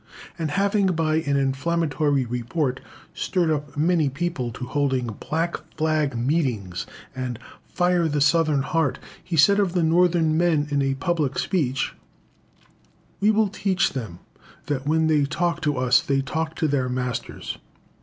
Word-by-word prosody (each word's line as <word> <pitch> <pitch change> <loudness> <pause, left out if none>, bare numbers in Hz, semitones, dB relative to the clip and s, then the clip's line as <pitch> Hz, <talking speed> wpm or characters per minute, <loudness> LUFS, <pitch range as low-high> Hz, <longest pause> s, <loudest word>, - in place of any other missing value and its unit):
And 160 -2 -1
having, 200 +4 +2
by 160 -3 +1
an 145 -3 0
inflammatory 145 0 0
report, 125 +3 -2 0.3
stirred 175 -4 0
up 145 -1 -3
many 160 -1 +2
people 145 -4 -2
to 125 - -6
hold 140 +1 0 0.3
"blackflag" 155 -3 -1
meetings 120 - -1 0.3
and 130 -2 -3 0.3
"fire 175 -1 +1
the 150 -1 0
Southern 145 -1 +3
heart," 160 -2 0 0.3
he 170 - -3
said 200 +7 +6
of 195 -4 +1
the 175 -2 +2
Northern 165 -1 +3
men 160 -3 +2
in 140 -1 +2
a 135 0 0
public 145 0 -1
speech 135 -8 0 1.3
"We 205 - +3
will 215 -1 +3
teach 195 -2 0
them 110 -10 -5 0.5
that, 140 -1 -3
when 160 +1 +3
they 150 -3 +3
talk 170 +3 -1
to 145 -3 0
us, 125 -1 +4
they 135 -1 0
talk 160 +3 -3
to 160 - 0
their 135 -3 0
masters." 125 -1 -4
150 Hz, 145 wpm, -24 LUFS, 135-170 Hz, 1.3 s, said